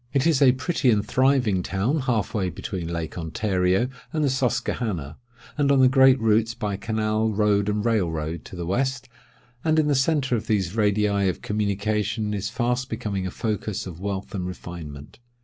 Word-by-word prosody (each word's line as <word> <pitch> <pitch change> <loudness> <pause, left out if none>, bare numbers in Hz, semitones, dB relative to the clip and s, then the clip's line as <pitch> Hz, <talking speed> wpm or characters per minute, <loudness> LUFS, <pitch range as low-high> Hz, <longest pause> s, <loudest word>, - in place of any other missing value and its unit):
It 140 0 +2
is 160 -5 +3
a 130 -3 +7
pretty 135 0 0
and 105 -2 +2
thriving 125 -5 +2
town, 100 - 0
half 120 -7 -1
way 95 -4 0
between 85 +1 -5
Lake 85 0 -4
Ontario 90 +5 +1 0.2
and 155 -1 0
the 140 - +2
Susquehanna, 110 - -2 0.4
and 140 -1 +3
on 140 - +4
the 130 - +7
great 130 0 +5
routes 115 +1 +2
by 105 -5 -2
canal, 110 +1 0
road, 105 -1 +2
and 105 +1 -1
rail 110 -7 +2
road, 80 0 -4
to - - -10
the 85 -1 -4
west; 130 +7 -1 0.6
and 155 0 +2
in 155 - +4
the 150 - +2
centre 135 -1 +2
of 110 - -4
these 100 -3 0
radii 105 -2 +2
of 90 - -5
communication 105 +1 -1
is 100 -2 -2
fast 125 0 -1
becoming 100 -4 -3
a - - -3
focus 105 0 -3
of 90 -3 -8
wealth 100 0 -4
and 90 -3 -3
refinement. 80 -5 -9
105 Hz, 185 wpm, -24 LUFS, 95-125 Hz, 0.6 s, a